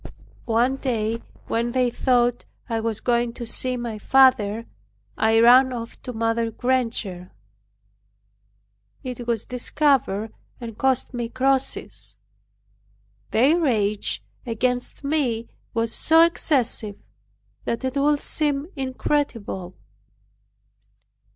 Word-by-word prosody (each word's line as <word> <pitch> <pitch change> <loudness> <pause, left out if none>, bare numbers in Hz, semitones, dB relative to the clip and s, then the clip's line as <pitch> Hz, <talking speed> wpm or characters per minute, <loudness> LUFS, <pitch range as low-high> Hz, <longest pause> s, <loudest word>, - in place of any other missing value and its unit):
One 240 +4 +2
day 230 -4 -1 0.2
when 235 +1 -1
they 250 -2 +2
thought 245 -1 +1 0.2
I 230 -2 -1
was 225 -1 -2
going 235 -1 +1
to 240 -1 -6
see 255 +2 +1
my 235 -3 -5
father, 230 -3 +4 0.5
I 225 0 +3
ran 255 +3 +7
off 230 -2 -7
to 250 - -6
Mother 230 0 0
Granger. 225 -7 -2 1.7
It 250 -2 -6
was 230 -3 0
discovered, 250 -5 0 0.3
and 230 -2 -7
cost 260 +2 +1
me 240 -1 -3
crosses. 250 - -1 1.1
Their 280 +9 +4
rage 215 -9 0 0.2
against 245 +3 -2
me 265 -6 -1 0.3
was 230 0 0
so 325 +1 +6
excessive, 250 -10 0 0.7
that 235 +3 -2
it 260 +1 -2
would 285 +1 +2
seem 295 0 -1
incredible. 255 -8 -2
240 Hz, 105 wpm, -23 LUFS, 225-260 Hz, 1.7 s, ran